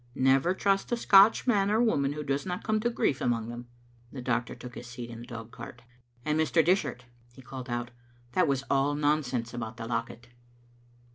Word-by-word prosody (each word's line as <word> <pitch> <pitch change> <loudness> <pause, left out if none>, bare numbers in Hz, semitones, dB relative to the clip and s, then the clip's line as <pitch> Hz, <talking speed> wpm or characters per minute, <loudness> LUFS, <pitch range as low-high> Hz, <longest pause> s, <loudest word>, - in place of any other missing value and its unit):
Never 135 +7 +3
trust 195 +2 +1
a 240 - +1
Scotch 200 -1 +6
man 205 -5 +3
or 215 +2 +2
woman 145 -13 +2
who 150 0 -5
does 140 0 -1
not 180 -1 -4
come 215 -1 +1
to 235 +3 0
grief 145 - 0
among 115 -2 0
them." 120 +1 -8 0.4
The 135 - -7
doctor 120 -1 -1
took 125 -1 -10
his 120 - -9
seat 120 -1 -8
in 115 - -8
the 120 - -10
dog 115 -2 -8
cart. 120 0 -10 0.4
"And, 150 +1 +1
Mr. 160 0 +3
Dishart," 175 -8 +1 0.3
he 130 - -14
called 130 0 -8
out, 120 0 -3 0.4
"that 180 +2 +2
was 135 -2 0
all 140 +1 +2
nonsense 145 -6 0
about 115 -1 -5
the 115 - -6
locket." 115 0 -4
135 Hz, 200 wpm, -29 LUFS, 120-175 Hz, 0.4 s, Scotch